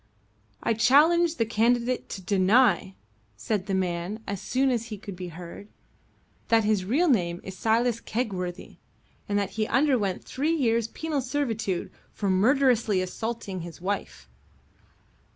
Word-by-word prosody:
"I - - +2
challenge 310 +9 +4
the 230 - +1
candidate 235 +3 +1
to 190 - -7
deny," 195 +1 +3 0.4
said 190 - -2
the 195 - 0
man, 185 +3 -2
as 200 -2 -4
soon 265 +1 +1
as 235 -2 -1
he 215 -2 -6
could 200 -1 -8
be 180 0 -6
heard, 175 +4 -10 0.8
"that 225 -1 +4
his 210 -3 +1
real 290 - +2
name 175 - +1
is 190 - -8
Silas 230 +3 +1
Kegworthy, 185 -7 -4 0.5
and 205 - +1
that 200 -1 -1
he 215 +2 -1
underwent 250 -8 +1
three 305 +5 -1
years' 230 -6 +1
penal 305 +3 -3
servitude 230 -8 -2 0.2
for 200 -2 -1
murderously 235 0 +3
assaulting 195 0 -4
his 170 0 -9
wife." 185 - -4
220 Hz, 140 wpm, -26 LUFS, 190-250 Hz, 0.8 s, challenge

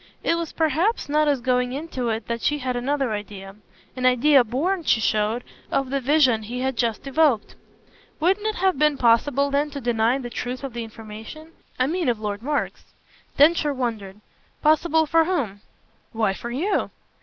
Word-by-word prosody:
It - - +2
was 335 -1 -3
perhaps 325 - 0
not 305 +1 +2
as 280 -4 +1
going 250 0 0
into 270 -4 -3
it 220 -1 -3
that 235 0 -3
she 295 - +1
had 255 -3 -3
another 270 0 -1
idea 200 -2 -6 0.4
an 255 -1 +1
idea 255 +2 +5
born, 310 - -1
she 240 - +3
showed, 215 +2 0 0.3
of 270 -1 0
the 275 0 0
vision 260 -4 +3
he 240 +4 -5
had 265 0 -1
just 230 0 -1
evoked. 275 -5 +2 0.7
"Wouldn't 385 +6 +1
it 435 - -1
have 375 -6 +1
been 300 -1 +3
possible 270 +4 +2
then 285 +2 +1
to 285 -1 -6
deny 235 0 +1
the 245 -3 -7
truth 250 +3 -5
of 270 -3 -5
the 235 -1 -4
information? 225 +8 -10 0.3
I 255 - +2
mean 330 0 0
of 235 -3 -1
Lord 210 -1 -4
Mark's." 290 +3 -3 0.5
Densher 295 -1 +4
wondered. 215 -6 -4 0.4
"Possible 315 +1 +3
for 325 +1 +3
whom?" 245 - -2 0.5
"Why 220 -3 +1
for 235 - -7
you." 315 +13 -1
260 Hz, 180 wpm, -23 LUFS, 230-300 Hz, 0.7 s, idea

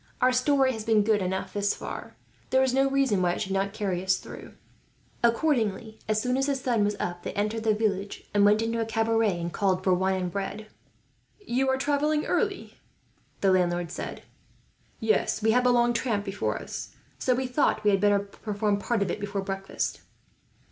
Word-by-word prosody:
Our 255 0 +4
story 260 +1 +3
has 220 -2 -5
been 220 -2 +3
good 210 -1 +2
enough, 190 +1 -3
thus 205 0 0
far. - - -7 0.3
There 260 0 +4
is 260 -1 +1
no 270 +1 +3
reason 270 -8 +2
why 175 -1 +2
it - - -4
should 195 -2 -3
not 195 +1 0
carry 195 -4 -2
us 190 0 +2
through." - - -10 0.7
Accordingly, 230 -4 +1
as 215 0 +1
soon 250 +3 0
as 270 +1 +1
the 280 - +1
sun 245 -5 0
was 205 0 0
up 175 0 -3
they - - -5
entered 215 +2 -1
the 220 -1 +3
village, 200 -2 -2
and 205 -1 +4
went 210 +2 +4
into 230 0 -1
a - - 0
cabaret 225 -4 +1
and 170 0 -4
called 190 -2 +1
for 185 - +3
wine 190 +1 +1
and 180 -1 -3
bread. 200 +3 -4 0.7
"You 265 -9 0
are 265 - +2
travelling 295 +2 +1
early," 405 -4 -2 0.6
the 195 - +4
landlord 175 -2 +1
said. - - -6 0.8
"Yes, 220 -1 +1
we 220 - +4
have 250 +2 +3
a - - +5
long 240 0 +3
tramp 225 -4 -1
before 200 0 -2
us, - - -7 0.2
so 255 - +2
we 260 +1 -1
thought 250 -4 +1
we 210 - +4
had 195 -1 +2
better 205 0 +4
perform 205 +1 -2
part 225 0 0
of 185 - -2
it - - -4
before 200 -1 -3
breakfast." 195 0 -3
215 Hz, 200 wpm, -27 LUFS, 195-250 Hz, 0.8 s, a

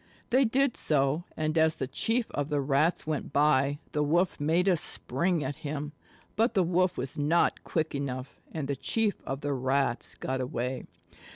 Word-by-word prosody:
They 260 +2 +5
did 265 +2 +2
so, 145 +3 +1
and 155 0 -1
as 160 0 +3
the - - -2
Chief 225 - -1
of 145 0 -2
the 145 -1 +1
Rats 140 +5 +1
went 155 -3 -3
by, 145 -1 +3
the 150 - 0
Wolf 170 +5 +1
made 165 +5 +2
a 185 - +5
spring 170 +2 0
at 135 +1 -4
him. 150 0 -4 0.4
But 225 +2 +2
the 190 - +4
Wolf 180 +1 +1
was 130 +3 -4
not 160 +4 +2
quick 160 -1 -1
enough, 135 -1 -5
and 155 -4 -4
the 140 - -1
Chief 215 - 0
of 135 +1 -4
the 145 -1 -1
Rats 130 -1 0
got 130 0 -3
away. 125 +1 -3
150 Hz, 180 wpm, -29 LUFS, 135-175 Hz, 0.4 s, They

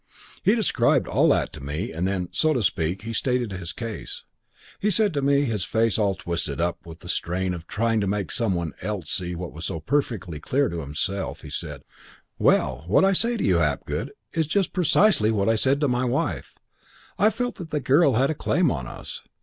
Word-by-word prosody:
"He - - +4
described - - +2
all - - +3
that - - +1
to - - -9
me 75 +9 -3
and 85 +3 -1
then, 95 -2 -2
so 155 -1 +3
to 125 -6 0
speak, 90 +2 0
he 115 +1 -5
stated 125 -2 0
his 90 -3 -5
case. 115 -3 -6 0.6
He 210 - +1
said 210 -1 +2
to 145 - 0
me, 140 +1 +3
his 110 -7 -1
face 115 +1 +1
all 100 -2 +2
twisted 85 -5 -3
up 85 0 -1
with 80 0 -11
the - - -11
strain 90 +1 -1
of 85 -1 -8
trying 115 0 +1
to 100 - 0
make 100 0 -1
some 115 -6 0
one 85 -3 -3
else 95 -4 -4
see 90 -1 -2
what 85 -1 -6
was 80 +2 -7
so 80 - -3
perfectly 105 - -1
clear 135 - +1
to 85 - -4
himself, 90 +7 -3
he - - -10
said, - - -5 0.6
'Well, 65 +1 +2
what 100 - +4
I 195 - +4
say 235 +5 +2
to - - -2
you, - - +3
Hapgood, - - -1 0.2
is 160 -2 0
just 195 +4 0
precisely 180 - +4
what 100 -3 +1
I 115 - +4
said 135 +5 +2
to 145 - +3
my 125 0 +1
wife. 120 - -2 0.6
I 210 +4 +6
felt 245 +3 -3
that 175 -6 -7
the 150 - -1
girl 140 +2 +4
had 135 +6 +2
a - - 0
claim 165 +3 +1
on 65 -3 -3
us. - - -8
110 Hz, 215 wpm, -25 LUFS, 90-140 Hz, 0.6 s, I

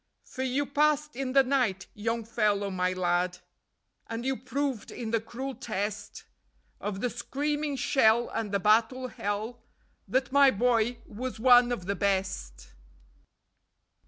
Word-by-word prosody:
_ - - -29
For 260 - -6
you 265 +2 0
passed 300 +1 +1
in 260 0 -3
the 275 0 +6
night, 250 -8 0
Young 230 +2 -2
Fellow 210 -3 0
My 185 0 0
Lad, 180 0 0 0.7
And 230 +1 -5
you 265 0 +1
proved 260 0 -3
in 225 -2 -5
the 230 -1 +1
cruel 260 +4 -6
test 210 -4 -4 0.6
Of 205 -1 -4
the 250 - 0
screaming 290 +4 -2
shell 240 -3 +3
and 225 -3 -3
the 200 - +1
battle 225 +6 +2
hell 215 +3 -4 0.5
That 260 -1 0
my 280 0 +7
boy 240 0 +1
was 245 +2 -6
one 245 0 +6
of 195 -7 -3
the 200 - 0
best. 190 - -2
235 Hz, 145 wpm, -28 LUFS, 205-260 Hz, 0.7 s, my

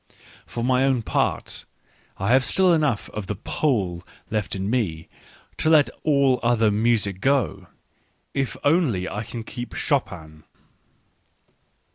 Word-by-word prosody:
For 120 - -4
my 130 +1 +3
own 130 -4 +2
part, - - -1 0.5
I 95 +3 -2
have 130 +1 +5
still 185 +3 +3
enough 150 -9 +1
of 105 -3 -6
the 105 - -2
Pole 95 - -1 0.3
left 105 -3 -2
in 95 0 -3
me 100 -9 -1 0.5
to 155 - +2
let 155 -3 +5
all 140 -4 +3
other 115 -2 +3
music 105 -3 +1
go, 125 -9 +1 0.7
if 135 -2 -2
only 145 - +2
I 105 - -4
can 115 +1 -7
keep 120 +1 -7
Chopin. 80 - -2
120 Hz, 130 wpm, -24 LUFS, 100-135 Hz, 0.7 s, have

